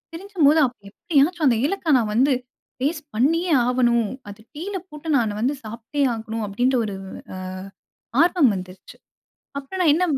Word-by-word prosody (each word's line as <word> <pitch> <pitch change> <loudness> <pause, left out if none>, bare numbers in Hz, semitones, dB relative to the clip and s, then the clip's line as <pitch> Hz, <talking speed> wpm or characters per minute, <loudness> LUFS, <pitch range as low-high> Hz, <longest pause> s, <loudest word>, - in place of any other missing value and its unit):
தெரிஞ்சும்போது 330 -5 +2
அப்போ 245 - -12
எப்படியாச்சும் 315 - +1
அந்த 235 -4 +3
ஏலக்காய் 320 -4 +2
நான் 215 -2 -1
வந்து, 265 +4 +4 0.5
டேஸ்ட் 300 +1 -2
பண்ணியே 330 +9 +2 0.2
ஆவணும். 240 -3 +2 0.2
அது 205 +2 -11
டீல 380 +7 -5
போட்டு 300 +2 -10
நானு 225 -3 +1
வந்து 260 +5 +1
சாப்ட்டே 230 +6 -5
ஆகணும் 225 -1 -4
அப்டின்ற 245 +6 +1
ஒரு 200 -2 -4 0.4
ஆ - - -6 0.9
ஆர்வம் 340 -7 +4
வந்துருச்சு. 185 +1 -10 0.6
அப்புறம் 285 +7 -6
நான் 310 -4 +5
என்ன 355 +4 +2
275 Hz, 145 wpm, -22 LUFS, 230-330 Hz, 0.9 s, நான்